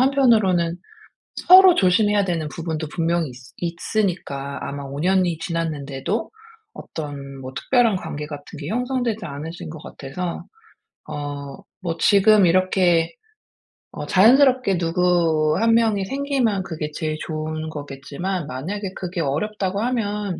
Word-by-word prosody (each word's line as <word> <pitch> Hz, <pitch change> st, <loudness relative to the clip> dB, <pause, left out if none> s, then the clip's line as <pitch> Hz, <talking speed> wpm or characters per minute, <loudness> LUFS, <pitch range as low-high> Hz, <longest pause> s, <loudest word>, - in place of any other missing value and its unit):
한편으로는 215 Hz, -11 st, +3 dB, 0.6 s
서로 370 Hz, 0 st, +8 dB
조심해야 205 Hz, +2 st, +3 dB
되는 165 Hz, -4 st, -1 dB
부분도 160 Hz, -1 st, -4 dB
분명히 165 Hz, -2 st, 0 dB
있스 125 Hz, 0 st, -14 dB
있으니까 170 Hz, -6 st, -2 dB
아마 140 Hz, 0 st, -5 dB
5 140 Hz, +1 st, -6 dB
년이 180 Hz, -1 st, +2 dB
지났는데도 160 Hz, -, -3 dB, 0.4 s
어떤 140 Hz, -3 st, -7 dB
뭐 130 Hz, 0 st, -7 dB
특별한 235 Hz, -, +2 dB
관계 150 Hz, -4 st, -5 dB
같은 145 Hz, +2 st, -9 dB
게 145 Hz, -, -6 dB
형성되지 245 Hz, 0 st, -1 dB
않으신 155 Hz, +2 st, -7 dB
것 155 Hz, -1 st, -9 dB
같아서. 170 Hz, +6 st, -6 dB, 0.6 s
어 145 Hz, -1 st, -6 dB, 0.3 s
뭐 165 Hz, -1 st, -2 dB
지금 205 Hz, -1 st, +5 dB
이렇게 175 Hz, -2 st, +3 dB, 0.8 s
어 -, -, -6 dB
자연스럽게 250 Hz, 0 st, +5 dB
누구 165 Hz, -3 st, +2 dB
1 230 Hz, 0 st, +3 dB
명이 220 Hz, -4 st, +2 dB
생기면 265 Hz, -6 st, 0 dB
그게 155 Hz, -3 st, -5 dB
제일 155 Hz, -1 st, -2 dB
좋은 155 Hz, 0 st, -4 dB
거겠지만 150 Hz, +4 st, -5 dB
만약에 185 Hz, +10 st, -5 dB
그게 180 Hz, -1 st, -5 dB
어렵다고 190 Hz, +6 st, -1 dB
하면 210 Hz, -6 st, -2 dB
175 Hz, 285 characters per minute, -22 LUFS, 155-205 Hz, 0.8 s, 서로